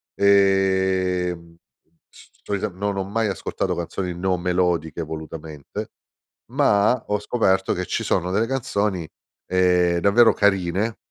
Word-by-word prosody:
ehm 95 -3 +2 0.5
c - - -18
cioè 100 - -2
no, 105 - -2 0.2
non 100 - -5
ho 95 - 0
mai 110 +3 -1
ascoltato 100 - -3
canzoni 90 +1 -4
non 90 0 0
melodiche 90 -2 0
volutamente, 80 -1 -7 0.6
ma 105 +4 +2
ho 105 - +1
scoperto 95 -4 +1
che 90 0 -3
ci - - -2
sono 90 +2 0
delle 105 +4 +1
canzoni 105 -9 -1 0.4
ehm, 90 -1 +2
davvero 110 +5 +5
carine 100 +2 +1
95 Hz, 125 wpm, -22 LUFS, 90-100 Hz, 0.6 s, davvero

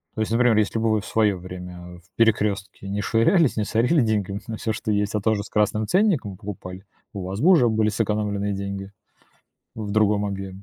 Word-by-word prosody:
То 110 - -2
есть, 110 - -2
например, 115 -1 +3
если 110 +1 +1
бы 115 0 +1
вы 110 - +2
в - - -12
свое 105 -3 +1
время, 90 0 -9
э, 90 0 -11
в 85 - -27
"Перекрестке" 105 -3 0
не 100 +1 -2
швырялись, 120 - +3
не 110 - +1
сорили 125 +9 +2
деньгами 105 -3 -1
на 110 -1 -5
всё, 110 - -2
что 110 0 -3
есть, 105 0 0
а 105 - 0
тоже 105 -1 +1
с - - -12
красным 105 0 0
ценником 175 - +1
покупали, 95 -2 -8 0.3
у 100 -3 -5
вас 95 +2 -5
бы 170 - +5
уже 130 -10 +5
были 110 -1 +1
сэкономленные 105 -1 -1
деньги 100 0 -5 0.8
в 105 -2 -5
другом 105 -1 +2
объеме. 95 -1 -6
105 Hz, 210 wpm, -23 LUFS, 100-110 Hz, 0.8 s, бы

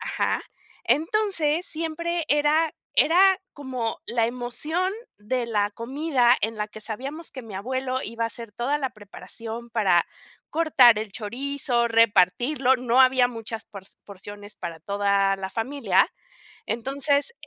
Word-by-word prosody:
Ajá. - - -1 0.4
Entonces 335 -2 +1
siempre 330 +1 -2
era 295 +2 +3 0.2
era 375 +4 +5
como 255 -5 -4
la 230 -1 +2
emoción 300 +10 -1 0.3
de 235 +3 -2
la 205 -2 0
comida 255 +1 +2
en 225 +1 0
la 210 0 -3
que 215 - -11
sabíamos 270 +10 -5
que 260 - -8
mi 220 -3 -10
abuelo 260 +5 -2
iba 230 +1 -4
a 230 - 0
hacer 230 -1 -9
toda 255 +7 -1
la 265 -2 -2
preparación 230 +2 -8
para 195 -7 +2 0.4
cortar 270 -8 +5
el 215 -2 -6
chorizo, 245 +2 -1
repartirlo, 230 +5 +3
no 250 0 +2
había 255 -1 +5
muchas 225 -2 -6
por 200 -2 -11 0.2
porciones 205 +1 -10
para 170 -2 -7
toda 200 +1 +1
la 190 0 -5
familia. 265 +7 +1 0.6
Entonces, 280 - 0
245 Hz, 135 wpm, -25 LUFS, 220-290 Hz, 0.6 s, era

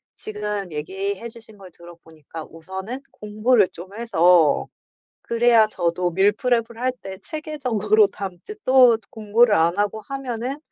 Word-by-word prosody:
지금 210 -3 -5
얘기해 190 +8 -4
주신 220 -2 -16
걸 190 -2 -13
들어보니까 165 -2 -12
우선은 190 +10 -7
공부를 215 0 +1
좀 185 +3 -11
해서 175 -9 +3 0.6
그래야 235 -1 +4
저도 175 -2 -1
밀프렙을 225 +4 +1
할 255 0 0
때 190 -1 -8
체계적으로 240 -9 +1
담지 195 - -8
또 255 -3 +6
공부를 220 +1 +2
안 170 +1 +2
하고 205 +1 -1
하면은 260 +2 -5
210 Hz, 280 characters per minute, -22 LUFS, 180-235 Hz, 0.6 s, 또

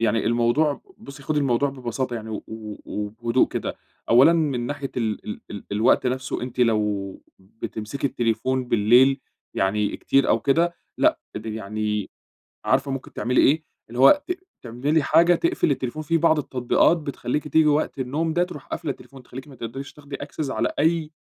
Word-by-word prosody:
يعني 115 0 +1
الموضوع 120 +6 +2 0.2
بُصّي 140 0 -11
خدي 150 +1 0
الموضوع 140 0 +2
ببساطة 130 -2 -4
يعني 110 0 -7
و 105 - -4
و 110 -2 -7
وبهدوء 115 +4 0
كده، - - -4 0.3
أولًا 130 +8 +7
من 140 -8 0
ناحية 140 -1 -4
ال 110 -3 -2
ال 105 - -5
ال 100 - -7
الوقت 110 +4 +3
نفسه، 130 0 -2
أنتِ 125 0 -4
لو 105 -4 0 0.2
بتمسكي 110 +6 -5
التليفون 125 +2 0
بالليل 125 +5 +5 0.3
يعني 100 +2 0
كتير 135 - +2
أو - - +3
كده 170 +5 +2 0.2
لأ، - - +3 0.2
تبقي 110 0 -5
يعني 105 -1 -3 0.6
عارفة 135 +1 +2
ممكن 135 -1 -6
تعملي 125 +1 +2
إيه؟ 155 +3 +3 0.3
اللي 120 +2 -6
هو 210 - +7
ت - - -1 0.3
تعملي 135 +6 0
حاجة 170 +4 +5
تقْفل 340 - +1
التليفون، 135 +3 -3
في 165 +2 +1
بعض 160 -1 +3
التطبيقات 130 +4 +2
بتخلّيكِ 150 -1 -3
تييجي 155 +1 +4
وقت 150 -1 +1
النوم 150 +6 -1
ده 175 +1 +3
ترُوح 180 0 -8
قافلة 155 -5 -3
التليفون، 135 -1 -13
تخلّيكِ 130 +4 -10
ما 135 - -13
تقْدَريش 135 +5 -7
تاخدي 145 -1 -9
access 145 +1 -5
على - - 0
أي 160 0 +1
130 Hz, 170 wpm, -24 LUFS, 115-150 Hz, 0.6 s, أولًا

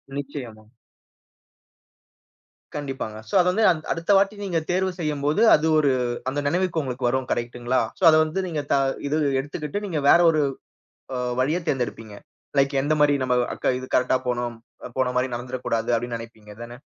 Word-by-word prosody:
நிச்சயமா. 130 -6 -7 2.1
கண்டிப்பாங்க. 135 -7 -5
சோ, - - -12
அது 180 - 0
வந்து 220 +4 +1
அ, - - +3 0.2
அடுத்த 165 +4 -1
வாட்டி 195 +2 +2
நீங்க 180 -4 0
தேர்வு 185 +1 +1
செய்யும்போது, 150 +2 0
அது 155 +2 0
ஒரு 145 -3 +3 0.4
அந்த 140 +2 -2
நினைவுக்கு 175 +1 0
உங்களுக்கு 130 -2 -2
வரும் 130 +1 -2
கரெக்ட்டுங்களா? 120 +1 -1 0.2
சோ, - - -6
அத 155 - +6
வந்து 155 +5 -3
நீங்க 160 -4 -2
த - - +5 0.3
இது 150 - +1 0.2
எடுத்துக்கிட்டு 150 +7 -4
நீங்க 165 -7 -2
வேற - - +7
ஒரு 155 -1 +1 0.7
அ - - -2 0.2
வழிய 150 +7 +1
தேர்ந்தெடுப்பீங்க. 115 -5 -3 0.4
லைக் 135 +1 +3
எந்தமாரி 150 0 +3
நம்ம 125 -1 +1 0.2
அக்க - - 0
இது 130 - -8
கரெக்ட்டா 125 +1 +3
போணும், 120 -1 -2 0.3
அ, - - -4
போனமாரி 125 0 +1
நடந்துற 125 +1 -5
கூடாது. 115 -1 -1
அப்பிடின்னு 120 0 -3
நினைப்பீங்க 110 -2 -12
தான? 120 +1 -10
135 Hz, 160 wpm, -24 LUFS, 125-155 Hz, 2.1 s, வேற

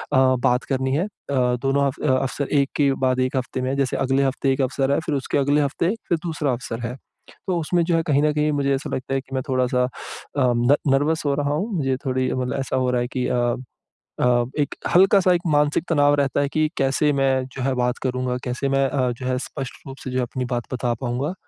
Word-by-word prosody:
बात 130 -1 +3
करनी 130 0 0
है। 160 - +1
अ, - - -7 0.2
दोनों 135 +2 +1
अव 145 - -4
अवसर 135 +1 -2
एक 140 0 +1
के 140 -2 +3
बाद 130 0 +1
एक 130 +1 0
हफ्ते 130 0 -3
में 130 - -1
है, 135 - -1
जैसे 135 -2 0
अगले 135 +1 +1
हफ्ते 135 0 +1
एक 135 - -1
अवसर 135 +1 0
है 140 - +2
फ़िर 150 - -1
उसके 135 +1 -1
अगले 145 +1 +3
हफ्ते 145 +4 0 0.2
फ़िर 170 - +3
दूसरा 155 -4 -1
अवसर 120 -2 -4
है। 125 - -6 0.5
तो 185 -2 +1
उसमें 170 +2 +1
जो 170 0 +1
है 165 - +3
कहीं 145 -2 +3
न 150 - +3
कहीं 150 0 +1
मुझे 140 -1 +1
ऐसा 135 - -5
लगता 130 +1 -4
है 135 - 0
कि 130 0 -9
मैं 130 - 0
थोड़ा-सा 125 -1 +1
अ, 125 - 0 0.5
न 125 0 +3 0.2
नर्वस 150 +4 +1
हो 140 - +2
रहा 145 0 0
हूँ 195 +10 -2
मुझे 135 -4 0
थोड़ी 130 -1 0
मतलब 125 0 -2
ऐसा 135 - -2
हो 130 -1 +1
रहा 125 -1 +1
है 120 - -1
कि 125 - 0
अ 120 -1 +1 0.7
अ, 120 -1 +3
एक 145 - 0 0.2
हल्का-सा 190 0 +5
एक 175 - -1
मानसिक 150 +2 +2
तनाव 145 -3 +4
रहता 140 -2 +1
है 140 - +1
कि 155 0 +2
कैसे 135 +2 +2
मैं 135 -2 +1
जो 130 - -3
है 135 +1 +1
बात 125 0 0
करूँगा, 125 -1 -1
कैसे 125 +3 -2
मैं 135 0 +2
अ, 130 -2 0
जो 125 +2 -7
है 130 0 0
स्पष्ट 135 -3 -6
रूप 135 0 -8
से 130 - -4
जो 125 - -4
है - - +2
अपनी 125 +1 -4
बात 120 +1 -4
बता 125 -1 0
पाऊँगा। 130 +7 -2
135 Hz, 240 wpm, -22 LUFS, 130-145 Hz, 0.7 s, हल्का-सा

